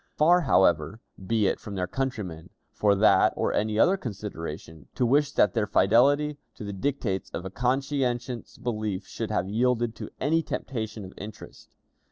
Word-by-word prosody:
Far, 175 +4 +5
however, 95 - +2 0.2
be 110 +2 +1
it - - +1
from 100 - -8
their 90 -1 -1
countrymen, 100 -8 -4 0.2
for 105 -1 +2
that 105 +2 +5
or - - 0
any 105 0 0
other 185 - +4
consideration, 85 - -7
to 125 - +1
wish 145 +4 +3
that 100 - +3
their 110 -3 0
fidelity 145 +8 +3 0.2
to 115 - -9
the 100 -1 -5
dictates 100 -3 -2
of 90 - -6
a 95 - -5
conscientious 125 0 -1
belief 110 -6 -3
should - - -5
have 90 - 0
yielded 120 +2 +1
to - - -6
any 160 +4 +2
temptation 110 -9 -5
of 95 - -11
interest. 105 +2 -11
110 Hz, 165 wpm, -27 LUFS, 100-130 Hz, 0.2 s, Far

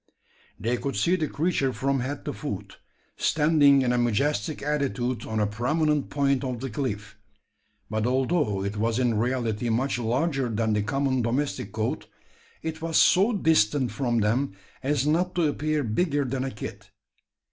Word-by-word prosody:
They 120 +3 0
could 140 +2 -3
see 175 +2 +2
the 155 -4 -1
creature 145 -3 0
from 135 +1 0
head 135 +3 -4
to - - -3
foot, - - -6 0.4
standing 150 -3 +4
in 125 -1 +1
a 125 - +2
majestic 120 +3 0
attitude 130 -5 -1
on 110 0 -2
a 105 - +3
prominent 145 +7 0
point 140 -1 +1
of 125 -3 -3
the 135 0 -5
cliff; 105 -5 -4 0.7
but 110 +2 -1
although 130 - +1
it 100 +1 -3
was 115 +2 0
in 125 -3 +2
reality 120 -2 -1
much 125 +3 0
larger 130 +3 0
than 110 0 0
the 105 - +1
common 130 +4 0
domestic 120 -2 -1
goat, 110 0 -2 0.6
it 160 0 -4
was 165 -1 0
so 195 +6 +5
distant 145 - +2
from 120 -4 0
them 115 +4 +1 0.3
as 140 0 0
not 175 +4 +1
to 175 - +2
appear 150 0 -1
bigger 145 +5 0
than 130 +1 -2
a - - -2
kid. 110 - -8
130 Hz, 165 wpm, -26 LUFS, 115-150 Hz, 0.7 s, so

